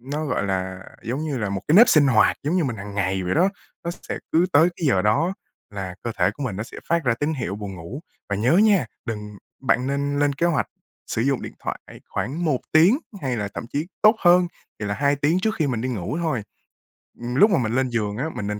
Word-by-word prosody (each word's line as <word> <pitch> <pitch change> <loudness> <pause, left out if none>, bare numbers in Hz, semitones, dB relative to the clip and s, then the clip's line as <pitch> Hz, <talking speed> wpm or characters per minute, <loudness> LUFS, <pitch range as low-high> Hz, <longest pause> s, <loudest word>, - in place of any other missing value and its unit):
nó, 145 +5 -4
gọi 130 - -1
là, 95 -1 -2 0.2
giống 125 +6 -3
như 145 -4 -2
là 105 -3 -1
một 100 -1 -2
cái 155 - +5
nếp 230 +3 +9
sinh 145 -3 +6
hoạt, 110 -5 +4
giống 155 +6 0
như 175 - +2
mình 125 -5 -2
hằng 100 0 -8
ngày 95 -1 0
vậy 90 - -1
đó. 180 +5 +4 0.4
Nó 170 - -1 0.2
sẽ - - -2
cứ 170 +3 +4
tới 160 +4 +6
cái 165 - -2
giờ 95 -9 +3
đó 165 - +2 0.4
là 95 -3 -5
cơ 115 - -2
thể - - +3
của 145 - -8
mình 110 -8 -3
nó 105 - -2
sẽ 115 - -10
phát 170 -2 +1
ra 125 -2 +3
tín 145 +6 -1
hiệu 105 -7 -3
buồn 100 -2 -6
ngủ. 90 - -8 0.3
Và 100 - -1
nhớ 115 +8 +2
nha, 200 - +4 0.2
đừng 105 -2 -5 0.3
bạn 130 -1 +2
nên 140 +1 -1
lên 145 -1 +2
kế 170 +5 0
hoạch 165 -5 +1 0.4
sử 110 - -1
dụng 135 0 +1
điện - - -6
thoại - - -5 0.3
khoảng 160 +7 -3
1 145 -6 +1
tiếng 175 - +6 0.2
hay 130 -3 -1
là 105 -2 -2
thậm - - -5
chí 150 +4 -1 0.2
tốt 215 +1 +7
hơn, 175 0 +5 0.3
thì 105 - -2
là 100 - -1
2 140 +3 +2
tiếng 150 +5 +2
trước 220 +2 0
khi 155 - +2
mình 120 -5 -1
đi 130 - -2
ngủ 115 - -3
thôi. 150 -9 -1 0.8
Ừm, 120 +1 -4
lúc 210 +7 +6
mà 180 - +4
mình 110 -2 -1
lên 130 0 +1
giường 105 -3 -2
á, 130 - -1
mình 100 - -3
nên 105 0 -3
130 Hz, 255 wpm, -23 LUFS, 105-155 Hz, 0.8 s, nếp